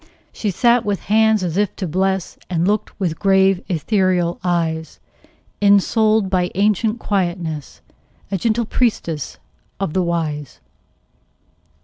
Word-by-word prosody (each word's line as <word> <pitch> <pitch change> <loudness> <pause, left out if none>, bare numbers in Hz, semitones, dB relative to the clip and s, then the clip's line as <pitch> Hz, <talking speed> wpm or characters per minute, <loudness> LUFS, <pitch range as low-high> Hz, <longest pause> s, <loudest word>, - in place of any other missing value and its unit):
She 210 - -2
sat 235 +5 +3
with 205 -3 -2
hands 220 -1 +3
as 175 -1 -2
if 205 -1 0
to 190 - -4
bless, 190 +3 -1
And 175 -1 0
looked 210 +1 -1
with 175 -5 -2
grave, 195 -2 +3
ethereal 180 -1 +1
eyes; 165 -3 -1 0.6
Ensouled 210 +1 +3
by 180 -2 0
ancient 215 +3 +1
quietness, 175 - -3 0.5
A 195 - -1
gentle 230 +4 +1
priestess 190 - -1 0.4
of 195 -6 -2
the 190 - +2
Wise. 160 -5 -3
190 Hz, 120 wpm, -19 LUFS, 170-210 Hz, 0.6 s, sat